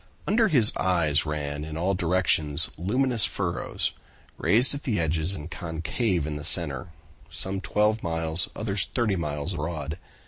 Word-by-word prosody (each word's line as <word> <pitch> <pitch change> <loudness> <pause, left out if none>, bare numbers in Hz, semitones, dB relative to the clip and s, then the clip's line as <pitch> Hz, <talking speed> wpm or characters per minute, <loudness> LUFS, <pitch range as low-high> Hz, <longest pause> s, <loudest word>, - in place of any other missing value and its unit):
Under 220 +2 +3
his 130 - +4
eyes 80 -5 +1
ran 75 -1 -3
in 80 0 -6
all 90 +4 0
directions 80 -4 +3
luminous 120 +6 0
furrows, 90 -4 -2 0.4
raised 125 +7 +4
at 140 - -5
the 115 - -1
edges 80 +3 0
and 75 +1 -8
concave 85 - -2
in 75 -1 -4
the 75 - -8
center, 85 0 +3 0.4
some 95 0 -4
twelve 105 +5 +1
miles, 80 +1 0
others 100 -4 0
thirty 115 -5 +1
miles 75 0 -3
broad. 80 0 -4
85 Hz, 145 wpm, -26 LUFS, 80-100 Hz, 0.4 s, his